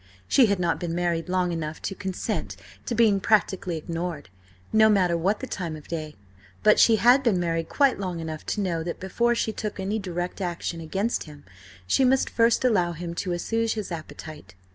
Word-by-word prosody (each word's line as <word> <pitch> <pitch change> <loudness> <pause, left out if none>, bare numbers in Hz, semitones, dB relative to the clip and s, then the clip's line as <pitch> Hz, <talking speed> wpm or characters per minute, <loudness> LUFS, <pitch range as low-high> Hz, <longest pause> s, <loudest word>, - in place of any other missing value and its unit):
She 255 -4 +5
had 200 -1 +1
not 175 -2 0
been 170 -1 -3
married 175 -1 -1
long 180 -1 +1
enough 160 -2 -4
to - - -2
consent 190 -2 -4 0.3
to 235 - -1
being 215 -3 +4
practically 190 -4 +1
ignored, 165 - -5 0.4
no 220 0 +6
matter 185 -5 +3
what 190 +6 0
the - - -3
time 175 -9 -4
of 150 - -12
day, 155 -2 -5 0.5
but 210 0 +5
she 225 - +6
had 245 +6 +5
been 225 -8 +2
married 165 -1 -1
quite 275 -6 +2
long 180 -3 -3
enough 160 -1 -5
to 210 - -1
know 175 -4 -1
that 170 +1 -5
before 235 +6 +1
she 220 -1 -1
took 210 -2 -5
any 200 +3 -1
direct 180 -1 -4
action 175 -1 -3
against 195 +8 -2
him, 150 -2 -13 0.4
she 95 - +2
must 260 +1 +3
first 230 +2 +3
allow 180 -8 +2
him 170 +1 -6
to 180 +1 -3
assuage 225 +6 -1
his 210 -4 -5
appetite. 155 - -8
180 Hz, 195 wpm, -25 LUFS, 165-215 Hz, 0.5 s, no